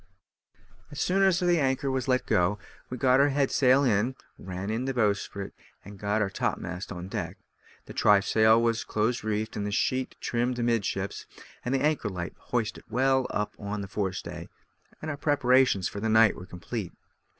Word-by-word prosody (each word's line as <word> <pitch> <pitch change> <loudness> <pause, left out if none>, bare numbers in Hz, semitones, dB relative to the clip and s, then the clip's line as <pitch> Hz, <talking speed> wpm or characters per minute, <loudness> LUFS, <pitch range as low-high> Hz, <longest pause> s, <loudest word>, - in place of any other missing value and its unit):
As 145 - -8
soon 190 +4 +2
as 190 -2 +4
the 175 -2 +3
anchor 135 0 0
was 130 -1 -2
let 130 -1 +1
go, 90 +4 +2 0.3
we 125 - -5
got 130 +1 +4
our 140 +1 +5
head 140 -1 +1
sail 135 +1 +4
in, 120 +1 +1 0.2
ran 95 +2 -5
in 115 +3 -2
the 135 -1 -2
bowsprit, 100 -3 -1 0.3
and 100 0 -11
got 105 +2 +1
our 100 - -1
topmast 90 0 -3
on 90 -1 -6
deck; - - -4 0.5
the - - -10
trysail 110 +2 +4
was 115 -1 +1
close 110 +2 -1
reefed, 110 0 -2
and 105 - -2
the - - -3
sheet 130 +5 0
trimmed 120 +1 -1
amidships, 115 -5 -1 0.4
the 135 +2 0
anchor 150 -7 +1
light 90 -2 -5
hoisted 115 -3 -3
well 130 +3 +2
up 105 0 -2
on 105 0 -4
the 100 - -5
fore 95 -1 -2
stay, 90 - -7 0.5
and 155 - -2
our 145 - -5
preparations 130 - +3
for 100 - -6
the 110 +2 -1
night 110 -1 +5
were 90 - -10
complete. 90 +2 -6
115 Hz, 180 wpm, -27 LUFS, 100-130 Hz, 0.5 s, our